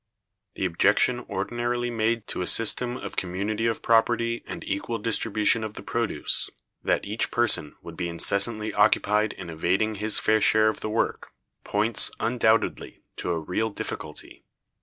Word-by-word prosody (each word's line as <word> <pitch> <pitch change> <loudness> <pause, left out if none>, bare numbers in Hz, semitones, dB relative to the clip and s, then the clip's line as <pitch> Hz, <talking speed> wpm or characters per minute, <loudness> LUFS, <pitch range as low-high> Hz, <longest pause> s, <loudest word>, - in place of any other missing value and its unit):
The - - -2
objection 100 +7 +3
ordinarily 120 +4 -2
made 115 0 0
to - - -3
a 90 - -2
system 120 +2 +2
of - - -7
community 100 +5 -2
of 115 - -2
property 115 +1 +2
and - - -7
equal 100 +4 -3
distribution 110 0 +2
of 110 0 -6
the - - -8
produce, 115 -10 0 0.3
that - - 0
each 105 +3 -1
person 110 -11 +1
would 85 - -9
be 85 0 -3
incessantly 100 +6 0
occupied 105 0 +2
in 90 -3 -8
evading 95 +7 0
his 105 0 +2
fair 110 0 +2
share 110 +1 +4
of 110 - -4
the 110 - -4
work, 110 - -2 0.3
points, 105 +2 +3
undoubtedly, 115 -1 0
to - - -3
a 85 -2 0
real 90 +8 -2
difficulty. 100 - -7
110 Hz, 155 wpm, -25 LUFS, 100-115 Hz, 0.3 s, share